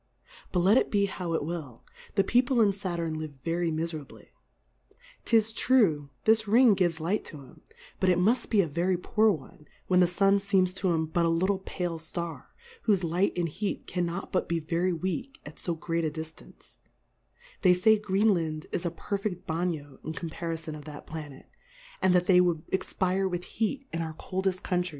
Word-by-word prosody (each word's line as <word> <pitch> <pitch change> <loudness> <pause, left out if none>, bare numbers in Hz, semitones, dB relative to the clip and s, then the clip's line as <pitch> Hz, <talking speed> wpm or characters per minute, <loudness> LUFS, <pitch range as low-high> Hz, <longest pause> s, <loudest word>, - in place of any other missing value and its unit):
But 180 - +2
let 195 +7 +5
it - - +2
be 200 -1 +2
how 180 -3 -4
it 160 - 0
will, 150 -7 -6 0.3
the 195 - +4
People 245 +4 +2
irr 210 -4 +5
Saturn 170 -5 -3
live 155 -2 -6
very 170 0 0
Miferably: 155 -2 -5 1.0
'Tis 225 -1 +3
tr,ue,^ 185 - +3 0.2
this 220 0 +4
Ring 230 +2 +6
gives 175 -4 +1
Light 175 +7 -1
to 155 - -8
'em, 130 - -16 0.4
but 190 - +3
it 180 - +4
muft 215 +8 +2
be 210 -3 +4
a 175 - -1
very 175 +5 0
poor 215 +5 +2
one, 150 -4 -5 0.2
v/hen 180 -1 +4
the 180 - +6
Sun 195 +3 +3
feems 190 -2 +2
to 190 -1 0
'em 160 -1 +1
but 170 +2 0
a 165 - +3
little 185 +4 +1
pale 175 -3 -4
Star, 170 +1 -6 0.4
whofe 200 -4 +3
Light 175 +4 +1
and 175 -1 +1
Heat 200 +6 -4
cannot 175 +1 -3
but 185 - 0
be 170 -1 +1
very 170 +3 0
weak 190 - -3
at 150 0 -11
fo 170 - -2
great 165 +1 -2
a 160 - +1
Diftance; 160 +1 -10 0.8
they 180 -3 +6
fay 215 +4 +4
Greenland 190 -6 +1
is2i 170 -1 -2
perfeQ: 195 -3 -3
Bagnio 160 -4 -3
in 160 - -4
com 165 0 -5
parifon 165 -2 -4
of 150 - -10
that 150 -2 -9
Planet, 150 -4 -8 0.6
and 185 -1 +4
that 180 0 +3
they 180 -1 +6
would 170 -3 +1
expire 190 0 0
with 175 -1 -3
Heat 240 +8 -2
in 165 - -1
our 160 -1 -4
coldefl: 190 +1 -2
Countries. 180 0 0
180 Hz, 185 wpm, -28 LUFS, 165-195 Hz, 1.0 s, Ring